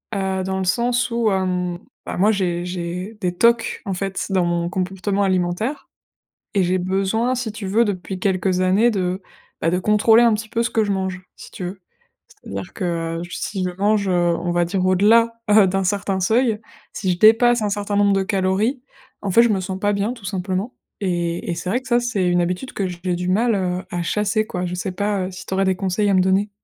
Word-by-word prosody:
Heu, 190 -1 -1
dans 190 0 -2
le - - -1
sens 240 +4 +1
où, 230 -1 +1
hem, 180 -2 -1 0.3
bah - - -4
moi 205 +4 +3
j'ai 180 -4 -1
j'ai 180 +4 -5
des 180 -2 -2
tocs 235 +3 +2
en 195 - -3
fait 195 +1 -3
dans 190 -2 +2
mon 175 0 0
comportement 195 +2 -1
alimentaire 190 +8 -1 0.6
et 200 - +2
j'ai 180 +1 +1
besoin, 195 +7 0
si 230 -4 -3
tu 210 -3 -6
veux, 225 +5 +3
depuis 190 -1 -4
quelques 185 -1 0
années 195 +6 +3
de, 185 -2 -2 0.4
bah 165 - +2
de 180 - +1
contrôler 215 +4 +4
un 235 -2 +5
petit 215 +1 -4
peu 230 - 0
ce 235 - 0
que 220 - +1
je 205 - -1
mange, 190 -1 -2 0.2
si - - -12
tu - - -7
veux. 185 +2 -5 0.5
C'est-à-dire 100 -1 -8
que 165 -2 -2
j 175 - -9
si 195 -3 -3
je 180 - 0
mange, 205 0 +2
heu, - - +2 0.3
on 175 +1 -2
va 175 0 +2
dire 185 +1 -1
au-delà, 220 +5 +4 0.2
heu, 210 -2 +7
d'un 195 +1 0
certain 195 0 -1
seuil, 220 +3 +2 0.3
si 190 -3 -1
je 175 - -1
dépasse 230 +2 +5
un 210 - 0
certain 205 0 -2
nombre 200 -1 +4
de 195 - +2
calories, 195 +7 0 0.4
en 200 - -2
fait 230 - +6
je 235 - +3
me 205 -3 +1
sens 190 0 -4
pas 205 0 +1
bien 200 +4 -1
tout 230 -5 -13
simplement 195 +3 -3 0.3
et 175 -3 -2
et - - -2
c'est 170 +2 -4
vrai 245 +7 0
que 260 - -14
ça 240 -1 +3
c'est 240 -7 -1
une 175 0 +2
habitude 180 +9 -3
que 195 - -1
j'ai 180 0 -3
du 180 +1 -3
mal, 225 +4 +2
heu, 180 -1 -1
à 175 -1 -2
chasser 210 +4 0
quoi. 180 0 -3
Je 180 0 -3
sais 180 +1 -3
pas, 200 -1 -1
heu, - - -8
si 180 - -9
t'aurais 190 0 0
des 190 0 +2
conseils 195 +3 0
à - - +3
me 185 - +5
donner? 190 +3 +2
190 Hz, 230 wpm, -21 LUFS, 180-215 Hz, 0.6 s, heu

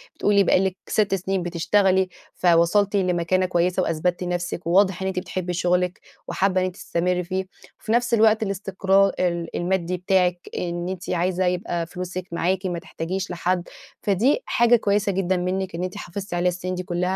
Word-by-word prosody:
بتقولي 200 -1 +3
بقى - - +4
لِك 190 0 -1
6 205 -2 +1
سنين 190 -1 -2
بتشتغلي 185 +2 +2 0.2
فوصلتِ 180 +4 +3
لمكانة 185 -1 +1
كويسة 180 +1 +1
وأثبتِّ 175 +2 -1
نفسِك، 175 -1 -3
وواضح 190 +1 +3
إن 190 - -1
أنتِ 190 -1 -1
بتحبي 180 -1 -4
شغلِك 180 +1 0 0.3
وحابة 185 -1 +1
إن - - +1
أنتِ 185 -1 -4
تستمري 180 0 -1
فيه، 185 +2 -3 0.4
وفي 220 - -4
نفس 240 +1 +2
الوقت 220 -1 +4
الاستقرا 195 0 +2
ال 170 -2 -1
المادي 180 0 -1
بتاعِك 180 -1 +1
إن 175 0 -3
أنتِ 185 0 -6
عايزة 180 +1 0
يبقى 180 -1 -1
فلوسِك 180 +1 -6
معاكِ 185 +3 0
ما 175 -2 -2
تحتاجيش 180 +4 -4
لحد، 175 0 -1 0.3
فدي 225 - +2
حاجة 235 0 +4
كويسة 205 -2 +1
جدًا 185 -1 0
منِك 185 0 -2
إن 175 - -3
أنتِ 185 +2 -4
حافظتِ 200 -1 -6
عليها 175 +1 +2
السنين 180 +1 -4
دي 180 - -4
كلّها 175 -1 -3
185 Hz, 170 wpm, -23 LUFS, 175-195 Hz, 0.4 s, بقى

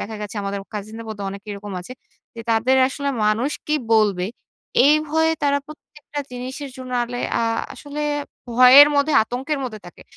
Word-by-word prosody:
দেখা 220 +1 -5
গেছে, 210 +1 -6
আমাদের 200 0 -3
কাজিনদের 215 +2 -7
মধ্যে 205 -2 -6
অনেকেই 200 +2 -9
এরকম 205 0 -8
আছে। 180 +8 -10 0.4
যে, 230 - -7
তাদের 230 +4 +3
আসলে 280 +1 -4 0.2
মানুষ 220 +6 +1 0.2
কি 305 - +1 0.2
বলবে, 205 -5 +3 0.6
এই 295 - +7
ভয়ে 320 +1 +2
তারা 285 0 +2
প্রত্যেকটা 300 -1 -9
জিনিসের 260 +3 -6
জন্য 255 -1 -8
আলে 245 +1 -6 0.2
আ - - 0 0.3
আসলে 290 0 -7 0.5
ভয়ের 255 +4 +8
মধ্যে 285 +2 +2
আতঙ্কের 265 +6 -3
মধ্যে 225 -4 -6
থাকে। 175 - -13
245 Hz, 165 wpm, -21 LUFS, 215-285 Hz, 0.6 s, ভয়ের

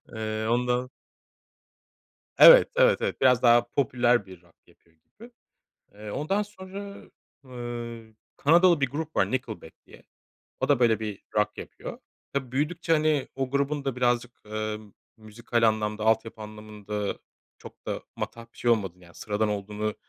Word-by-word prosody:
Iıı, 110 0 -2
ondan 125 +1 0 1.5
Evet, - - +9
evet, - - +4
evet. - - -2
Biraz 125 -2 +5
daha 120 0 +5
popüler 120 -4 +2
bir 95 -2 -13
rock 85 -2 -26
yapıyor 85 -1 -27
gibi. 130 - -17 0.6
Eee, 105 0 -9
ondan 190 - -1
sonra, 200 0 -9 0.5
ııı, 120 -2 -7 0.2
Kanadalı 170 +1 +5
bir 135 - +2
grup 155 +3 -5
var - - +2
Nickelback 115 -10 -4
diye. - - -17 0.6
O - - 0
da, 140 -3 +3
böyle 115 -3 +3
bir 105 -3 -5
rock 105 0 +1
yapıyor. - - -8 0.3
Tabii 130 -3 -3
büyüdükçe, 160 +5 -1
hani, 155 -3 +2
o 135 -1 -3
grubun 140 +1 -1
da 135 -3 -2
birazcık, 120 -1 +1
ııı, 110 0 -3 0.4
müzikal 115 +1 -3
anlamda 110 0 -2
altyapı 110 0 0
anlamında 105 -1 -6 0.4
çok - - -14
da - - -3
matah 115 0 -6
bir - - -22
şey 120 - +1
olmadığını, 95 -6 -1
yani 85 - -18
sıradan 105 0 -1
olduğunu 105 +1 -3
120 Hz, 145 wpm, -26 LUFS, 110-140 Hz, 1.5 s, Evet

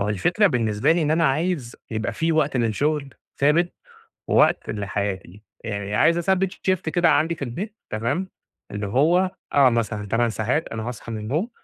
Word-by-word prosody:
هو 100 - 0
الفكرة 175 - +2
بالنسبة 115 - +2
لي 170 0 +1
إن 150 - 0
أنا 165 +1 +3
عايز 150 -3 0
يبقى 110 -1 -2
في 165 0 0
وقت 150 -4 +1
للشغل 135 +5 0 0.2
ثابت 160 +5 +3 0.6
ووقت - - +3
لحياتي، 100 -2 -4 0.2
يعني 100 -1 -3
عايز 170 +9 +4
أثبِّت 190 +2 +1
Shift 185 -3 -1
كده 175 +1 +3
عندي 160 +3 +2
في - - -18
البيت 190 - -6
تمام، 120 - -2 0.4
اللي 105 0 -4
هو 170 - +3 0.2
آه، 140 -2 +6
مثلًا 110 -3 -2
8 115 +4 +1
ساعات 120 +8 -1
أنا 110 -1 -5
هاصحى 120 -1 -6
من 110 - -3
النوم، 140 - -2
135 Hz, 170 wpm, -23 LUFS, 110-165 Hz, 0.6 s, آه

